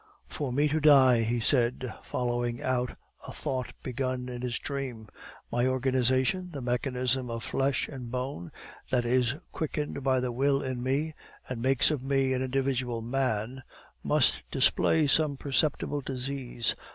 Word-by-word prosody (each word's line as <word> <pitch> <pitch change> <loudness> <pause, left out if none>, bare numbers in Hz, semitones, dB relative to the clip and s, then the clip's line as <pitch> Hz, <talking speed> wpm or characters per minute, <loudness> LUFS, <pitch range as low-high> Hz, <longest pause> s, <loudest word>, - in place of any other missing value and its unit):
"For 140 -4 -4
me 145 +4 +2
to 155 +2 +1
die," 135 -5 +6
he 115 +2 0
said, 120 0 +2
following 120 -1 -2
out 125 -1 -1 0.3
a - - -6
thought 130 -4 -3
begun 130 0 -3
in 120 -1 -6
his 125 -1 -2
dream, 130 -6 -4 0.4
"my 120 +1 +2
organization, 130 +6 +1
the 145 - -6
mechanism 125 0 -1
of 115 0 -4
flesh 135 0 0
and 130 -4 -7
bone, 125 - -4 0.4
that 125 -2 +1
is 125 +1 +2 0.2
quickened 150 -2 -3
by 130 -1 +2
the 125 -1 -1
will 135 +3 +1
in 130 -2 -3
me, 140 +5 0 0.3
and 125 -3 -5
makes 135 +3 +4
of 150 -4 -1
me 135 0 +1
an 130 - -1
individual 130 -3 -1
MAN, 125 -1 -1 0.4
must - - +3
display 160 -1 +3
some 145 0 +2
perceptible 145 +1 0
disease. 130 -2 -2
130 Hz, 150 wpm, -29 LUFS, 125-135 Hz, 0.4 s, die